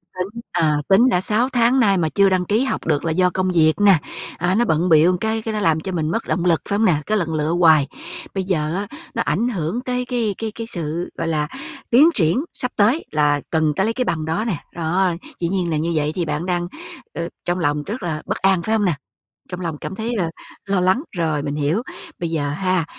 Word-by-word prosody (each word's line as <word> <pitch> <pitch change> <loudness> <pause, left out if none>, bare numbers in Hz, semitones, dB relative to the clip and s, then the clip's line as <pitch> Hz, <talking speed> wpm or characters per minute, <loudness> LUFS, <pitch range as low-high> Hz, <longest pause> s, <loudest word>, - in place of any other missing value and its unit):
Tính, 200 +6 -4
ờ, 155 -4 +2
tính 230 +7 +6
đã 180 -5 +2
6 225 +6 +1
tháng 245 +1 +3
nay 200 -5 +4
mà 160 -3 +1
chưa 200 +2 +4
đăng 185 -1 +1
ký 215 +7 +2
học 270 - -2
được 150 -1 +1
là 165 - +1
do 180 +3 +3
công 185 +1 -1
việc 160 -3 +4
nè, 200 -3 +7 0.4
à, 175 +2 +1
nó 240 +3 +3
bận 165 0 +1
bịu 165 +3 +5
cái 220 0 0
cái 220 0 -4
nó 210 - -1
làm 160 -5 +2
cho 190 +4 -5
mình 160 -3 -1
mất 225 - -2
động 175 - 0
lực 170 -3 +3
phải 200 - +1
không 220 - +3
nè? 180 - +4
Cái 215 - +1
lần 165 -5 -1
lựa 155 0 0
hoài. 155 -5 +5 0.5
Bây 190 -1 -1
giờ 160 -4 -1
á, 200 +1 -3 0.3
nó - - +1
ảnh 190 +12 0
hưởng 190 +3 -2
tới 250 0 -2
cái 235 -5 -1
cái 225 -1 -3
cái 230 -1 -5
sự, 170 -4 -4
gọi 165 - -2
là, 150 -2 0 0.4
tiến 285 +8 +7
triển 175 - +2
sắp 250 - -3
tới 230 +10 +2
là 145 -1 +2
cần 160 -2 +1
ta 190 - +1
lấy 225 +3 0
cái 255 +1 -1
bằng 160 -6 -1
đó 165 +8 -1
nè. 205 -9 -1 0.2
Đó, 175 +2 +1 0.3
dĩ 170 - 0
nhiên 185 -3 -1
là 155 - +1
như 165 +2 -1
vậy 150 -1 +1
thì 175 - -1
bạn 150 +2 -2
đang 175 -1 -1 0.5
ơ, 170 0 -4 0.2
trong 175 +1 0
lòng 145 -2 0
rất 215 +8 -5
là 155 -3 -2
bất - - -2
an, 190 -2 +2
phải 220 +5 0
không 210 -2 +1
nè? 175 - +2 0.6
Trong 180 0 -6
lòng 165 -4 -3
cảm 190 - -6
thấy 225 +4 -3
là 175 -5 0 0.4
lo 195 -1 +1
lắng, 185 +9 +2
rồi, 155 -4 0
mình 145 -1 -3
hiểu. 150 +9 0 0.4
Bây 170 -1 -3
giờ 145 -3 -1
ha, 185 +2 0
180 Hz, 250 wpm, -21 LUFS, 160-210 Hz, 0.6 s, nè